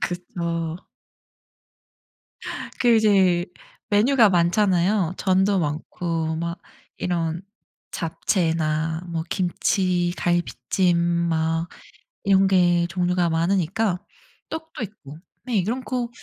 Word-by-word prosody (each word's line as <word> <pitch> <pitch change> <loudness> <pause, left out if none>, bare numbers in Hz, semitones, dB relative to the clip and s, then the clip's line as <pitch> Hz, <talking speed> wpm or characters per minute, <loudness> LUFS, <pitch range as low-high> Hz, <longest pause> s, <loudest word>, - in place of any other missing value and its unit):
그쵸. 170 -2 -3 2.0
그 240 -2 +5
이제 190 -5 +3 0.4
메뉴가 220 +2 +5
많잖아요. 180 +1 +2
전도 190 +1 +2
많고 160 +1 -2
막 170 +1 -4 0.4
이런 170 -1 -2 0.5
잡채나 160 -1 -1
뭐 165 -1 -2
김치, 180 -1 0
갈비찜 175 +1 0 0.3
뭐 165 +1 0 0.6
이런 195 0 +4
게 175 -2 +3
종류가 180 0 0
많으니까 180 +3 0 0.5
떡도 320 -5 -6
있고, 160 -8 -10 0.2
네 245 -3 -3
이런 225 +8 -1
거 250 -2 -2
175 Hz, 175 characters per minute, -23 LUFS, 165-195 Hz, 2.0 s, 그